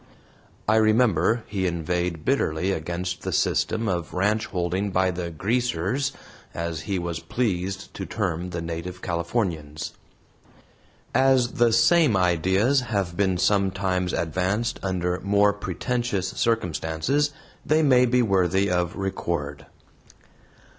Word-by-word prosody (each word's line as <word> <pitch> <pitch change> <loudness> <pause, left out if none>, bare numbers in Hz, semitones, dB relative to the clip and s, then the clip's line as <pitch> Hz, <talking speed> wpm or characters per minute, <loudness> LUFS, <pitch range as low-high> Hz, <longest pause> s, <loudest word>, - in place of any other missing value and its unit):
I 110 +1 +4
remember 110 -1 +3
he 95 -3 -1
inveighed 85 -1 -2
bitterly 95 - +1
against 90 +2 -3
the 95 - -3
system 110 +7 +1
of 85 -4 -2
ranch 105 +4 +1
holding 90 +2 -1
by 95 0 +2
the 90 -1 -4
"greasers," 120 - -1 0.4
as 85 -1 -3
he 100 - +1
was 85 -2 -3
pleased 95 0 -2
to 95 - -6
term 90 -4 -2
the 85 -1 -4
native 85 +2 -6
Californians. 85 -4 -2 1.2
As 130 -1 +4
the 120 -1 +3
same 120 - +4
ideas 95 - +3
have 100 -8 -2
been 95 -2 +1
sometimes 95 -1 +1
advanced 95 +8 -1
under 90 -2 -1
more 100 +1 +3
pretentious 105 -2 -2
circumstances 115 - 0 0.3
they 155 +1 +2
may 125 -3 +5
be 125 +1 +3
worthy 95 -1 +2
of 90 -1 0
record. 85 -7 -3
95 Hz, 120 wpm, -25 LUFS, 85-110 Hz, 1.2 s, may